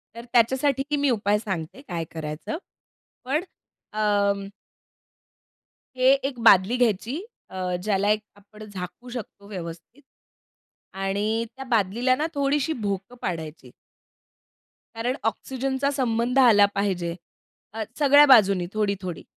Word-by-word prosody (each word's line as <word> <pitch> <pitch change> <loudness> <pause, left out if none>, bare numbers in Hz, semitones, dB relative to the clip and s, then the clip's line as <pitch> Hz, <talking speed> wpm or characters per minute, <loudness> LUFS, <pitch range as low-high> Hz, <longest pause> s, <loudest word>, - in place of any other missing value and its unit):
तर 235 +1 -9
त्याच्यासाठी 270 +4 +2
मी 285 -1 +2
उपाय 210 -3 +2
सांगते 190 - -5
काय 170 -1 -3
करायचं. 155 - -5 0.7
पण 280 +6 0 0.5
अं 200 -2 +1 1.5
हे 255 +1 +5
एक 270 -3 -3
बादली 190 +5 +6
घ्यायची 240 - 0 0.3
अ, 185 -1 -2
ज्याला 205 0 +1
एक 215 0 +1
आपण 210 +1 -15
झाकू 200 +6 -8
शकतो 220 -4 -8
व्यवस्थित 175 - -8 0.9
आणि 205 +4 -1
त्या 270 - -8
बादलीला 235 +2 +2
ना 300 - -1
थोडीशी 285 +2 +1
भोकं 205 0 -4
पाडायची. 160 -3 -5 1.2
कारण 245 +3 -1
ऑक्सिजनचा 265 +4 -1
संबंध 250 -1 0
आला 220 -6 +7
पाहिजे. 180 -4 -1 0.6
अ, 225 - -3 0.2
सगळ्या 290 0 +7
बाजूनी 200 -9 +5
थोडी-थोडी. 200 -5 -2
215 Hz, 110 wpm, -25 LUFS, 195-255 Hz, 1.5 s, आला